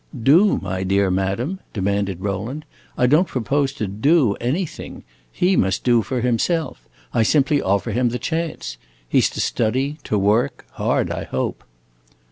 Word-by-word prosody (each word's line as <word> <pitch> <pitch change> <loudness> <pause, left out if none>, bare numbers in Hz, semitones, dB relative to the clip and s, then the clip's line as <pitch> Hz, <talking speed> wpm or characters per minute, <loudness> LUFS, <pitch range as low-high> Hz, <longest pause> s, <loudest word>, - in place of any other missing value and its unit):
"Do, 175 - +5
my 95 0 -3
dear 95 0 +2
madam?" 100 - -1
demanded 100 -2 -1
Rowland. 105 +10 -4 0.3
"I 125 - +3
don't 155 +8 +4
propose 135 +2 0
to 110 - -3
do 115 - +2
anything. 150 +9 -3 0.3
He 185 +2 +2
must 95 - +1
do 120 -2 +4
for 125 +4 -3
himself. 125 - -1 0.2
I 115 - +2
simply 145 +5 +3
offer 100 +4 0
him 120 +3 +1
the 120 - -2
chance. 160 - -3 0.3
He - - +3
's - - +2
to - - -7
study, 130 +7 0
to 105 - 0
work 105 +4 +1
hard, - - 0
I - - -4
hope." 65 - -3
120 Hz, 155 wpm, -21 LUFS, 100-145 Hz, 0.3 s, Do